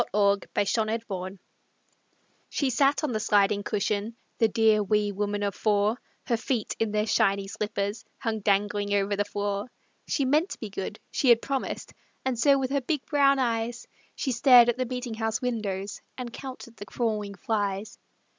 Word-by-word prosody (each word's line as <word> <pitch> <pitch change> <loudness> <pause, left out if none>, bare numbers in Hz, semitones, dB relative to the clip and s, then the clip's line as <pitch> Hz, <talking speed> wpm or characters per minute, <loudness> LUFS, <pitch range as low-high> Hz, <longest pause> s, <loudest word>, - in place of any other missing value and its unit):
A 205 - -3
LAUGH 200 -1 +4 0.2
IN 205 - +3
CHURCH 215 -4 -2 1.2
She 275 -3 0
sat 275 +4 +2
on 300 - 0
the 215 - -1
sliding 205 -1 +3
cushion, 210 +2 -1 0.2
The 225 - +5
dear, 220 -1 +3
wee 210 0 +1
woman 205 +1 -2
of 200 -1 0
four; 210 +3 +1 0.2
Her 235 - +1
feet, 230 -1 -2
in 225 - +1
their 210 0 +1
shiny 195 -2 +2
slippers, 205 +1 -3
Hung 225 -2 -2
dangling 205 0 +1
over 200 0 +1
the 205 - +1
floor. 205 +1 -2 0.4
She 275 - +1
meant 305 +8 +2
to - - -7
be 215 -3 -6
good; 195 +2 -5
she 265 - +2
had 235 -1 +7
promised, 270 +1 -4 0.3
And 255 -3 -1
so 280 +2 +5
with 265 -1 -2
her 280 0 +1
big, 285 +2 -2
brown 280 -1 +4
eyes, 235 -1 -1 0.3
She 265 - -1
stared 245 0 +7
at 240 - 0
the 255 - 0
meetinghouse 230 -3 -2
windows 210 -5 -3 0.2
And 245 -2 -6
counted 255 -3 -9
the 205 - -9
crawling 210 -2 -2
flies. 205 0 -2
220 Hz, 175 wpm, -27 LUFS, 205-245 Hz, 1.2 s, had